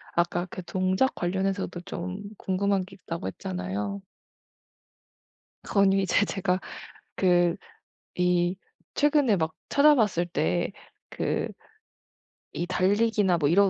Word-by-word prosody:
아까 175 +1 +1
그 185 - -6
동작 185 +8 +1
관련해서도 190 0 -2
좀 180 +3 -5 0.2
궁금한 195 0 0
게 190 0 -14
있다고 165 - -5
했잖아요. 95 +2 -4 1.6
그건 200 -1 +3
이제 195 +1 +2
제가 185 -2 0 0.6
그 175 -2 +3 0.6
이 180 0 +2 0.4
최근에 290 -7 +3
막 160 -2 0 0.2
찾아봤을 240 - +4
때 90 - 0 0.4
그 - - -1 1.1
이 175 - -2
달리기나 205 -1 +2
뭐 145 -2 +2
이런 195 +4 +5
185 Hz, 210 characters per minute, -27 LUFS, 175-200 Hz, 1.6 s, 이런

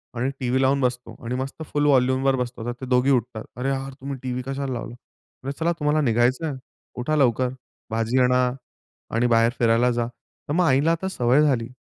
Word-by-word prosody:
आणि 125 +3 0
टीव्ही 130 +1 0
लावून 135 +1 +2
बसतो 125 -1 -2
आणि 120 +2 -2
मस्त 135 +4 -4
फुल 145 0 -1
वॉल्यूमवर 130 -1 +3
बसतो, 125 -2 -4
तर 120 - -1
ते - - -4
दोघी 125 +2 +3
उठतात. 120 -3 0
"अरे, 125 +3 -2
यार 135 0 -3
तुम्ही 135 0 -5
टीव्ही 125 -1 -2
कशाला 135 0 -3
लावला," 120 - -5
म्हटलं, 130 +2 -11
"चला, 165 +1 +2
तुम्हाला 150 +1 +2
निघायचंय, 125 +5 +1 0.5
उठा 155 +5 0
लवकर 130 -3 +2 0.4
भाजी 115 +3 +1
आणा 125 0 +3 0.7
आणि 120 +1 +3
बाहेर 115 0 +4
फिरायला 115 +1 +3
जा." 120 -1 0
तर 120 +4 -10
मग 180 +3 +3
आईला 145 +2 +3
आता 170 +3 -1
सवय 125 -4 +3
झाली, 130 -6 +2
130 Hz, 190 wpm, -24 LUFS, 120-140 Hz, 0.7 s, बाहेर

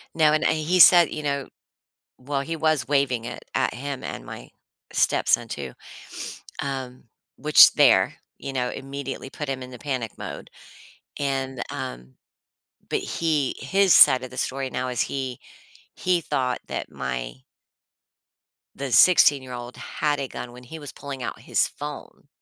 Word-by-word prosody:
Now, 155 -2 +4
and, 155 - +1
uh, - - +3
and 160 - +1
he 165 +4 +1
said, 175 -1 +8
you 155 - -5
know 140 -2 -2 0.7
well, 135 +1 -2
he 165 +4 -4
was 155 -5 +1
waving 135 -4 +1
it 120 - -8
at - - +1
him 135 +1 -6
and - - -6
my - - -9 0.4
stepson 120 0 +2
too, 70 - -6 0.9
um, 130 -2 -5 0.3
which - - +7
there - - +4 0.2
you 135 - -5
know, 125 -1 -1
immediately 135 0 -6
put 150 +2 -6
him 130 -1 -3
in 125 - -10
the 125 - -10
panic 130 -7 -3
mode, - - -8 0.7
and, 135 -2 -2
um 60 +1 -7 0.8
but - - 0
he 155 -5 -1
his 190 +6 +3
side 130 -3 +8
of 130 - -7
the - - -11
story 135 0 -2
now 125 0 -3
is 125 -2 -2
he 130 -3 -4 0.6
he 180 -1 +1
thought 130 -4 -1
that - - -5
my - - -4 1.4
the 140 0 -5
sixteen-year-old 130 -6 +4
had 150 -1 -2
a 135 -2 -4
gun 120 - -7
when 125 +1 -13
he 160 +6 -9
was 145 -2 -9
pulling 140 -2 -7
out - - -5
his - - +1
phone. - - -9
135 Hz, 160 wpm, -24 LUFS, 125-150 Hz, 1.4 s, said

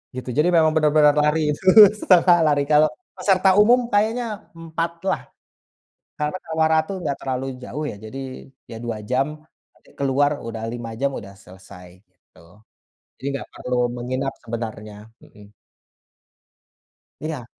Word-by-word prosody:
gitu. 130 0 -6
Jadi 150 +3 +3
memang 160 -2 +5
benar-benar 150 -1 +4
lari, 150 +1 +2
itu 150 - -6 0.4
setengah 180 -1 +5
lari. 145 -2 +2
Kalau 150 0 +5 0.3
peserta 190 -1 +3
umum 235 +4 +6
kayaknya 220 +3 +1 0.3
4 165 0 -4 0.2
lah, - - -1 1.0
karena 150 +4 -2
Kawah 160 -1 +1
Ratu 160 +3 +1
enggak 145 -5 -2
terlalu 130 0 -3 0.2
jauh 145 +4 -6
ya. - - -9
Jadi, 130 +5 -8 0.5
ya 115 - -8
2 115 -2 -4
jam, 130 +4 +1 0.5
nanti - - -26
keluar 145 +2 +1
udah 115 -1 -6
5 115 0 -6
jam, 140 +2 -1
udah 100 -5 -8
selesai 90 -1 -15
gitu. 90 -3 -27 0.8
Jadi 135 - -9
nggak - - -10
perlu 125 0 -3 0.2
menginap 130 +3 -3
sebenarnya, 110 -2 -7 0.2
mhm. 105 0 -18 1.7
Iya. 150 -5 -5
140 Hz, 135 wpm, -22 LUFS, 115-160 Hz, 1.7 s, umum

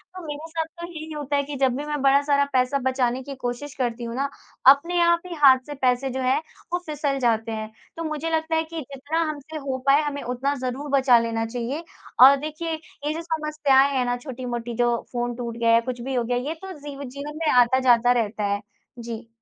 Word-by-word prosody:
तो 365 -2 -8
मेरे 300 +2 -6
साथ 325 0 -2 0.2
तो 340 - -5
यही 315 -1 -8
होता 290 -1 -2
है 280 - +2
कि 285 0 -6
जब 260 -2 +2
भी 290 - -4
मैं 295 -2 -3
बड़ा 275 +1 +5
सारा 280 -1 +3
पैसा 255 +2 +2
बचाने 255 -1 0
की 280 0 -7
कोशिश 250 +3 -5
करती 240 -2 -2
हूँ 230 0 -5
ना, 275 +2 -1 0.4
अपने 335 +6 +6
आप 340 0 +4
ही 355 - -6
हाथ 260 -2 +8
से 295 - -6
पैसे 255 +1 +2
जो 260 +1 -3
है 255 +1 +2 0.4
वो 355 - +2
फिसल 290 -2 -1
जाते 225 -2 +1
हैं। 215 0 -5 0.3
तो 330 - -3
मुझे 310 0 -3
लगता 320 0 0
है 320 - +2
कि 330 -1 -5
जितना 285 +4 -4
हमसे 305 +1 -6
हो 275 -3 -3
पाए 280 +2 +6
हमें 285 -1 -3
उतना 250 +3 -1
ज़रूर 260 +2 -4
बचा 265 -3 +5
लेना 225 -1 -1
चाहिए 245 +7 -4 0.4
और 275 - +9
देखिए 310 +3 -4
ये 310 -1 -5
जो 325 - -4
समस्याएँ 305 -4 +2
हैं 250 - +1
ना 245 0 0
छोटी-मोटी 245 -2 -5
जो 240 -1 +3 0.2
फ़ोन 240 -1 -2
टूट 235 -1 -5
गया 230 -1 +3
या 230 - +6
कुछ 245 -1 -4
भी 265 +2 -4
हो 240 - +1
गया, 245 +1 -1
ये 275 +6 -2
तो 385 - -7
ज़ी 285 -1 -8
जीवन 285 +3 -7
में 310 - +2
आता-जाता 245 -1 +5
रहता 220 -3 0
है। 205 - -2 0.4
जी। 230 0 -7
270 Hz, 225 wpm, -24 LUFS, 245-300 Hz, 0.4 s, और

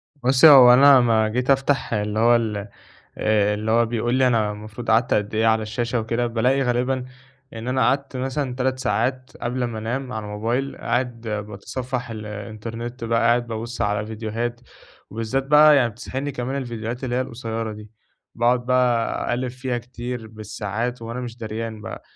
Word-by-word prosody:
بُصّي، 135 +2 +5
هو 125 -4 +9
أنا 140 +1 +8
أمّا 115 -3 +3
جيت 125 +4 -2
أفتح 135 -2 +1
اللي 105 0 -1
هو 120 +1 +5
ال 110 -3 0 0.6
آآ، 105 -1 +2
اللي 110 +1 -2
هو 115 0 +4
بيقول 120 +2 -1
لي 130 -1 +4
أنا 110 -3 +1
المفروض 110 +3 -5
قعدت 115 +2 +3
قد 105 +1 -1
إيه 110 +1 +2
على 110 0 +3
الشاشة 120 +2 -2
وكده، 115 +2 -1
بالاقي 125 +4 +1
غالباً 125 +1 0 0.5
إن 115 +2 -7
أنا 130 +1 0
قعدت 135 0 +1
مثلًا 130 0 -2
3 130 0 -1
ساعات 130 +4 -1
قبل 125 +1 -2
ما 115 -2 -3
أنام 125 +3 -4
على 110 -1 -4
الموبايل 115 +6 -2
قاعد 120 -1 -2
باتصفّح 115 +5 -4
الإنترنت 110 +3 -7
بقى 115 0 +1
قاعد 120 +1 +2
بابُصّ 115 +1 -5
على 105 0 0
فيديوهات 115 +2 -4 0.5
وبالذات 115 +5 -2
بقى 150 +1 +7
يعني 125 -4 +3
بتسحلني 130 +5 -5
كمان 125 +2 -4
الفيديوهات 120 -1 -5
اللي 125 -1 -2
هي 130 - +1
القصيّرة 115 -3 -4
دي، 105 0 -12 0.4
باقعد 120 +1 +2
بقى 125 -2 +1
أقلّب 125 +1 -1
فيها 125 0 -3
كتير 120 -1 -6
بالساعات 110 +2 -4
وأنا 115 +2 -5
مش 120 -1 -7
دريان 110 -1 -5
بقى - - -7
120 Hz, 170 wpm, -22 LUFS, 110-125 Hz, 0.6 s, هو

